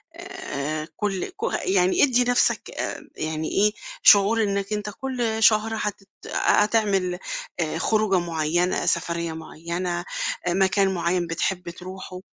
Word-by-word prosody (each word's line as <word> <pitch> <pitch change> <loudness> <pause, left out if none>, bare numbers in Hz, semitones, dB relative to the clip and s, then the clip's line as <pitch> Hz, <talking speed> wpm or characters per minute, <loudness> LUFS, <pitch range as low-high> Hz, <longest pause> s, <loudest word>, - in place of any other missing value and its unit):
آآ، 250 - -5
كل 200 -3 -1
ك - - -12 0.2
يعني 185 -1 +3
ادي 250 -3 +4
نفْسك، 245 0 +1
آآ، - - -5
يعني 155 0 -3
إيه، 210 +2 +3 0.3
شعور 210 +3 +6
أنك 200 0 -1
أنت 210 0 -3
كل 230 -1 -2
شهر 215 +1 +5
هتت 200 -2 -4 0.3
هتعمل، 200 -4 +2 0.4
آآ، - - -1
خروجة 215 -4 +2
معينة، 170 +1 0
سفرية 170 -1 0
معينة، 170 +2 -4 0.5
آآ، - - +2
مكان 190 +1 +2
معين 175 0 0
بتحب 175 +2 -2
تروحه. 185 +1 -9
190 Hz, 125 wpm, -24 LUFS, 175-215 Hz, 0.5 s, شعور